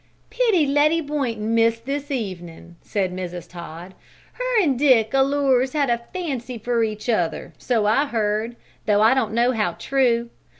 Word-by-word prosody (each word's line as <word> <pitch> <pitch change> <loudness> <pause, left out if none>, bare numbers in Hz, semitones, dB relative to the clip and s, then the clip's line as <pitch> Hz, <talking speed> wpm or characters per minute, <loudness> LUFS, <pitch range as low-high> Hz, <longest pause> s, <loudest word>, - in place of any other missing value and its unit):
"Pity 445 -10 +2
Letty 295 +3 +3
Boynton 250 -8 -2
missed 230 0 +2
this 285 +1 -4
evenin'," 175 - -6
said 190 -3 -2
Mrs. 180 -2 -6
Todd. 175 +1 -10 0.4
"Her - - 0
an' 300 -10 +2
Dick 250 -5 +3
allers 270 -1 +2
had 285 -4 +1
a 235 0 0
fancy 265 -9 -4
for 235 +1 0
each 215 0 -4
other, 180 -8 -1
so 230 -4 0
I've 275 +7 +2
heard, 220 0 -1 0.3
though 210 0 +4
I 225 - +6
don't 240 -5 0
know 240 +2 +3
how 210 -8 -1
true. 235 -2 0
235 Hz, 160 wpm, -22 LUFS, 210-275 Hz, 0.4 s, I